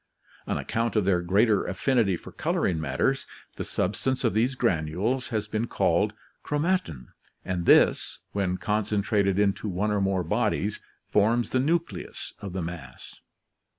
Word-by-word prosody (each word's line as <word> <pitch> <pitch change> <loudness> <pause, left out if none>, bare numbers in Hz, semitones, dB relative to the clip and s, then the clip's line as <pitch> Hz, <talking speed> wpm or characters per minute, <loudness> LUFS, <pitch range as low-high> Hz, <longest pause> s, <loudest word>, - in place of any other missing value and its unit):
On - - 0
account 115 0 -1
of 105 -3 +2
their 90 -2 +3
greater 100 +4 +3
affinity 115 -9 +1
for - - -12
coloring 80 -3 0
matters, 80 - 0 0.3
the - - -2
substance 130 +8 -1
of 115 - +2
these 120 +5 +1
granules 100 +4 0
has 110 -3 -2
been 110 +2 -2
called - - +1 0.3
chromatin, 145 - -1 0.4
and 90 -2 -2
this, - - +4
when 95 -2 -1
concentrated 100 0 +1
into 105 +1 +1
one 100 +3 0
or 105 -1 +1
more 95 -2 +1
bodies, 80 - 0 0.2
forms 115 +3 +2
the 130 - +2
nucleus 165 +5 -2
of 100 - -5
the 95 -2 -2
mass. 80 -7 -8
105 Hz, 145 wpm, -27 LUFS, 90-115 Hz, 0.4 s, this